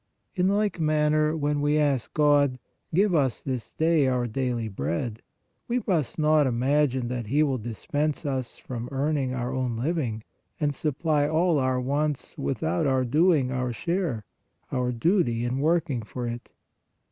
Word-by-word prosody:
In 180 Hz, -1 st, +1 dB
like 205 Hz, -1 st, +1 dB
manner, 155 Hz, 0 st, +2 dB
when 145 Hz, -1 st, 0 dB
we 145 Hz, +1 st, +2 dB
ask 140 Hz, -5 st, +1 dB
God: 145 Hz, -3 st, +4 dB, 0.2 s
" -, -, -49 dB
Give 195 Hz, +1 st, +3 dB
us 135 Hz, -7 st, +2 dB
this 130 Hz, -4 st, -4 dB
day 160 Hz, -3 st, +2 dB
our 125 Hz, -1 st, +1 dB
daily 120 Hz, -1 st, -2 dB
bread," 95 Hz, -, -3 dB, 0.5 s
we 245 Hz, 0 st, 0 dB
must 165 Hz, -, 0 dB
not 155 Hz, -2 st, +4 dB
imagine 130 Hz, +1 st, +1 dB
that 120 Hz, -3 st, -3 dB
He 145 Hz, +7 st, +3 dB
will 135 Hz, -4 st, 0 dB
dispense 145 Hz, +8 st, -2 dB
us 130 Hz, -3 st, -3 dB
from 120 Hz, -1 st, -6 dB
earning 140 Hz, -1 st, 0 dB
our 125 Hz, +1 st, -3 dB
own 125 Hz, -3 st, -1 dB
living, 125 Hz, -5 st, -2 dB, 0.4 s
and 145 Hz, -2 st, +1 dB
supply 150 Hz, 0 st, 0 dB
all 160 Hz, 0 st, +2 dB
our 130 Hz, -1 st, +1 dB
wants 145 Hz, +2 st, -2 dB
without 115 Hz, -, -1 dB
our 130 Hz, -1 st, +2 dB
doing 150 Hz, 0 st, +3 dB
our 125 Hz, -1 st, -1 dB
share, 160 Hz, -, -2 dB, 0.5 s
our 125 Hz, -1 st, 0 dB
duty 120 Hz, -, +1 dB
in 125 Hz, +2 st, -1 dB
working 155 Hz, -4 st, +1 dB
for 120 Hz, +3 st, -6 dB
it. 120 Hz, 0 st, -5 dB
140 Hz, 160 wpm, -26 LUFS, 125-155 Hz, 0.5 s, God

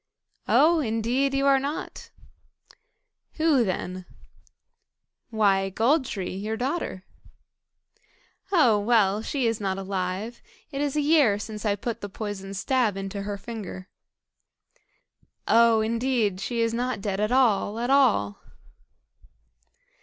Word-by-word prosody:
"Oh! 330 Hz, +2 st, +4 dB
indeed 250 Hz, +2 st, 0 dB
you 275 Hz, 0 st, +1 dB
are 275 Hz, -1 st, +5 dB
not." 285 Hz, +3 st, -5 dB, 1.2 s
"Who 310 Hz, -6 st, +3 dB
then?" 185 Hz, -2 st, -4 dB, 1.2 s
"Why, 200 Hz, -4 st, +2 dB
Gold 260 Hz, -, +2 dB
tree, 190 Hz, -7 st, -4 dB
your 215 Hz, +3 st, -3 dB
daughter." 255 Hz, -, -3 dB, 1.5 s
"Oh! 250 Hz, -, +4 dB
well, 210 Hz, -2 st, +2 dB
she 265 Hz, +2 st, -2 dB
is 225 Hz, -1 st, 0 dB
not 190 Hz, -1 st, -1 dB
alive. 195 Hz, +4 st, -4 dB, 0.3 s
It 275 Hz, -1 st, -3 dB
is 290 Hz, -1 st, -1 dB
a 300 Hz, -, +2 dB
year 290 Hz, -9 st, +4 dB
since 210 Hz, +1 st, -5 dB
I 200 Hz, -, +2 dB
put 230 Hz, +2 st, -5 dB
the 205 Hz, -, -6 dB
poisoned 195 Hz, -2 st, -6 dB
stab 230 Hz, -1 st, +1 dB
into 195 Hz, +1 st, -5 dB
her 200 Hz, 0 st, -4 dB
finger." 195 Hz, -4 st, -8 dB, 1.6 s
"Oh! 230 Hz, -1 st, +5 dB
indeed 230 Hz, -3 st, 0 dB
she 235 Hz, +2 st, -2 dB
is 230 Hz, 0 st, +1 dB
not 245 Hz, -1 st, -2 dB
dead 195 Hz, -1 st, -3 dB
at 215 Hz, +2 st, 0 dB
all, 225 Hz, -5 st, +2 dB
at 240 Hz, +3 st, -1 dB
all." 230 Hz, -, +3 dB
225 Hz, 125 wpm, -25 LUFS, 200-255 Hz, 1.6 s, are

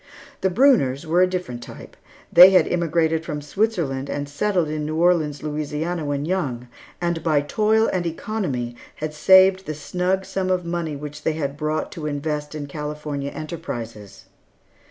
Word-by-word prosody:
The 190 Hz, -, +2 dB
Brunners 180 Hz, -, +3 dB
were 170 Hz, +3 st, +2 dB
a 185 Hz, -, +5 dB
different 180 Hz, -10 st, -4 dB
type. -, -, -11 dB, 0.4 s
They 180 Hz, +2 st, +11 dB
had 190 Hz, -1 st, +5 dB
immigrated 165 Hz, -2 st, +1 dB
from 150 Hz, -3 st, -4 dB
Switzerland 145 Hz, -5 st, -1 dB
and 145 Hz, 0 st, -3 dB
settled 180 Hz, +3 st, 0 dB
in 150 Hz, 0 st, -3 dB
New 155 Hz, +1 st, -3 dB
Orleans, 160 Hz, -4 st, +2 dB
Louisiana, 155 Hz, +3 st, -3 dB
when 145 Hz, 0 st, -2 dB
young, 135 Hz, -9 st, -2 dB, 0.3 s
and 170 Hz, -1 st, -1 dB
by 155 Hz, -3 st, +2 dB
toil 215 Hz, +8 st, +2 dB
and 185 Hz, -2 st, 0 dB
economy 160 Hz, -, -3 dB, 0.2 s
had 155 Hz, 0 st, -5 dB
saved 190 Hz, +4 st, +5 dB
the 155 Hz, -, -3 dB
snug 180 Hz, +5 st, -1 dB
sum 185 Hz, -1 st, -2 dB
of 180 Hz, -1 st, 0 dB
money 170 Hz, -3 st, -3 dB
which 150 Hz, +1 st, -8 dB
they 155 Hz, -1 st, -1 dB
brought 150 Hz, +2 st, -2 dB
to 155 Hz, -2 st, -5 dB
invest 150 Hz, +1 st, -3 dB
in 150 Hz, -1 st, -4 dB
California 150 Hz, -1 st, -5 dB
enterprises. 120 Hz, -, -7 dB
155 Hz, 155 wpm, -22 LUFS, 145-180 Hz, 0.4 s, They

